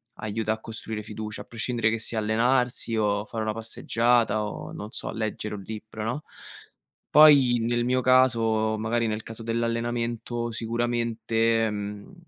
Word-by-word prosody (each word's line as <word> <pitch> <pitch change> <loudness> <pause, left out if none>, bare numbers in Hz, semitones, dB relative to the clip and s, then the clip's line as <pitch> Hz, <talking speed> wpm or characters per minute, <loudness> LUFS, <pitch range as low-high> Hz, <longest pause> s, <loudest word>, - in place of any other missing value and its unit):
aiuta 110 0 -2
a 110 - -7
costruire 110 -1 -5
fiducia, 110 0 -6
a - - -10
prescindere 115 -1 0
che 115 0 -1
sia 115 0 0
allenarsi 120 +2 +1
o 105 -1 +1
fare 110 0 -4
una 110 - -1
passeggiata 115 0 +1
o, 105 - -6
non 105 - -7
so, - - -5
leggere 110 -1 -3
un 100 - -7
libro, 110 0 -7
no? 125 +7 -3 0.9
Poi 140 -5 +7
nel 120 +1 0
mio 130 +1 +2
caso 115 -4 +3
magari 115 +2 0
nel 110 0 -3
caso 115 0 -8
dell'allenamento, 115 0 -2
sicuramente, 115 -1 0
mhmm, 105 - -6
115 Hz, 145 wpm, -26 LUFS, 110-120 Hz, 0.9 s, Poi